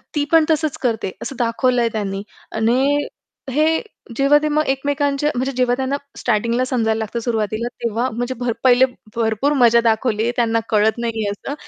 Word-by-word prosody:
ती 290 -1 +1
पण 325 -1 +5
तसंच 310 -2 0
करते 225 -5 -1
असं 275 - -5
दाखवलंय 240 0 +1
त्यांनी 200 -2 -3 0.3
आणि 260 +6 +2 0.5
हे 310 +4 +2 0.4
जेव्हा 275 +2 +5
ते - - +1
मग 305 +1 +1
एकमेकांच्या 285 +1 0
म्हणजे 260 +2 -1
जेव्हा 250 -1 +2
त्यांना 265 +2 -1 0.2
स्टार्टिंगला 235 +4 0
समजायला 225 -4 0
लागतं 220 +2 -3
सुरुवातीला 225 0 -2 0.2
तेव्हा 235 +2 0
म्हणजे 245 +2 -3
भर 245 -2 -1
पहिले 255 0 +6 0.3
भरपूर 230 +5 +1
मजा 235 -1 +6
दाखवली 225 0 +1
त्यांना 230 -1 +2
कळत 220 +1 +2
नाहीये 225 -3 -2
असं 240 +7 -6
240 Hz, 160 wpm, -20 LUFS, 225-275 Hz, 0.5 s, पहिले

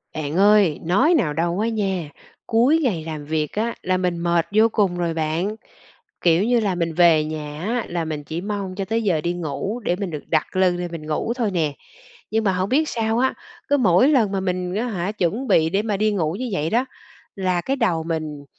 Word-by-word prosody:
Bạn 155 +2 -3
ơi, 200 -5 +4
nói 250 - +3
nào 165 - +2
đâu 170 +4 -1
á 225 +2 +1
nha, 190 -8 -2 0.4
cuối 250 +8 +4
ngày 190 - 0
làm 155 -2 -6
việc 155 0 -1
á, 230 +3 -1
là 185 0 0
mình 180 -2 -1
mệt 170 -1 +1
vô 220 +1 +6
cùng 190 -4 +1
rồi 170 -2 -1
bạn, 165 +6 -1 0.7
kiểu 170 +1 +4
như 240 +2 +3
là, 200 -4 0
mình 170 -2 -1
về 165 -2 +5
nhà 150 -1 -6
á, 230 +3 -1
là 170 -2 -2
mình 155 -2 -4
chỉ 160 +4 -5
mong 200 -2 -4
cho 195 0 -3
tới 225 +3 -1
giờ 175 -7 +1
đi 170 +2 -1
ngủ 175 - -4
để 175 - +1
mình 195 0 -4
được 150 -2 -6
đặt 155 +1 0
lưng 185 -1 +3
lên 175 -1 -4
mình 160 -2 -7
ngủ 155 +9 -1
thôi 230 -5 -1
nè. 160 -5 0 0.6
Nhưng 220 +1 +1
mà 195 -3 +2
hổng 185 +2 -1
biết 305 +4 +2
sao 225 -1 -1
á, 260 +1 +2 0.4
cứ 285 - +4
mỗi 200 -1 +4
lần 240 -9 +3
mà 195 - -1
mình, 180 -1 -2
á 230 +4 -1
hả, 195 -4 -2
chuẩn 215 +6 -1
bị 160 -6 +4
để 195 +4 +1
mà 210 -2 -2
đi 215 +1 +2
ngủ 165 -6 0
như 255 -1 -3
vậy 155 -2 -1
đó, 240 +6 +1 0.5
là 185 -2 0
cái 270 +9 -1
đầu 185 -11 0
mình, 155 -3 -4
185 Hz, 230 wpm, -22 LUFS, 165-215 Hz, 0.7 s, vô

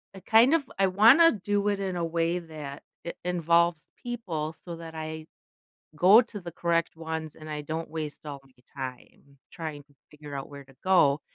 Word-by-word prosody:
I 190 - -9
kind 225 +8 +5
of 310 -5 +1
I 195 - +4
wanna 230 - +7
do 205 0 -1
it 205 -1 +1
in 190 -2 -2
a 170 - -1
way 165 +1 0
that 155 -4 -9 0.2
it 170 - -6
involves 170 -2 +2
people 175 -11 -4
so 170 +1 -9
that 165 -1 -9
I 155 0 -6 0.7
go 195 +8 +8
to 225 -3 -9
the 175 -2 -8
correct 170 -1 0
ones, 160 -1 -5
and 155 0 -11
I 150 -1 -4
don't 160 +2 -4
waste 155 -1 -6
all 140 -2 -6
my 135 - -23 0.3
time 135 +2 -9
trying 155 -3 -6
to 145 -1 -28 0.2
figure 150 -1 -10
out 135 - -5
where 140 -1 -10
to 135 0 -20
go, 155 -7 +4
165 Hz, 190 wpm, -27 LUFS, 150-190 Hz, 0.7 s, go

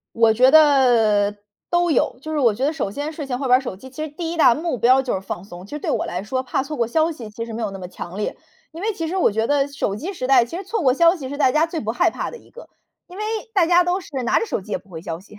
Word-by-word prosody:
我 230 -1 +5
觉 255 +4 +5
得 240 -9 +4 0.3
都 345 0 +2
有。 255 -3 +1
就 315 +3 -6
是 310 - -1
我 235 -6 +3
觉 250 +6 -2
得 295 - +1
首 280 -11 -3
先 290 +8 -4
睡 300 -2 -6
前 250 -2 -3
玩 270 -1 -3
会 250 +1 +5
手 240 - -6
机， 260 +7 -12
其 265 +4 -7
实 - - -5
第 330 +3 -5
1 - - -5
大 260 -7 +6
目 315 -2 -3
标 255 +3 +5
就 260 - -2
是 190 - -2
放 190 -2 -6
松， 180 -2 -11
其 - - -18
实 295 - -4
对 - - -3
我 - - 0
来 180 +1 -4
说 255 +5 -2
怕 260 +1 -1
错 300 +2 -6
过 235 - +1
消 315 +8 +1
息 240 -9 -8
其 230 +2 -6
实 230 - -8
没 225 +1 -4
有 215 - -2
那 195 - -8
么 180 -1 -7
强 175 0 -8
烈。 210 - -3 0.4
因 325 - -9
为 440 +2 0
其 330 -5 -4
实 350 +4 -3
我 370 - +3
觉 220 +2 0
得 285 0 +2
手 280 -8 -2
机 340 - -5
时 255 -9 -4
代， 260 -2 +5
其 240 +8 -7
实 385 - -6
错 445 +1 -2
过 260 -4 +4
消 335 +4 +5
息 280 -8 -7
是 285 - -5
大 275 -3 +3
家 310 +3 +3
最 330 -1 -4
不 220 - -3
害 240 - +2
怕 - - -4
的 475 - -10
一 - - -21
个， - - -13 0.4
因 360 +2 -12
为 - - -3 0.3
大 375 -6 +3
家 350 +1 +4
都 355 +2 0
是 - - -13 0.2
拿 - - +3
着 455 - -2
手 385 - -2
机 210 - -9
也 - - 0
不 195 +3 -24
回 165 -4 -8
消 165 0 -5
息。 210 +1 -16
265 Hz, 345 characters per minute, -21 LUFS, 220-320 Hz, 0.4 s, 大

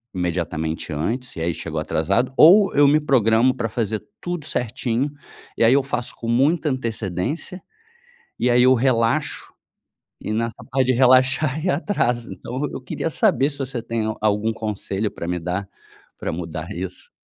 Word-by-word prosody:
imediatamente 80 -3 -2
antes, 120 - -3
e 80 - -5
aí 85 0 0
chego - - -5
atrasado. 100 +11 0
Ou 195 +6 +7
eu 145 0 +5
me 150 +2 +4
programo 125 -2 +3
para 115 -3 -2
fazer 110 -1 -2 0.2
tudo 175 -4 -4
certinho, 125 +3 -1 0.5
e 115 - +4
aí 120 - +6
eu 140 - +3
faço 125 -2 -3
com 115 - -6
muita 150 +7 +2
antecedência, 120 - -3 0.8
e 125 - 0
aí 125 - +5
eu 130 +1 +6
relaxo, 125 +3 +1 0.7
e - - -2
nessa 115 +1 -2
parte 130 0 +1
de 130 - +3
relaxar 130 +4 +3
e 185 - +1
atraso. 125 - -1
Então 130 +3 -6
eu - - -5
queria 130 +5 -4
saber 135 -1 +2
se 140 - -9
você 130 -3 -4
tem 115 -1 -2 0.2
algum 110 +1 +1
conselho 105 -1 -3
para 85 - -7
me 90 0 -1
dar, 90 +3 -3 0.5
para - - -4
mudar 80 +1 -5
isso. 90 -1 -7
120 Hz, 165 wpm, -22 LUFS, 105-135 Hz, 0.8 s, Ou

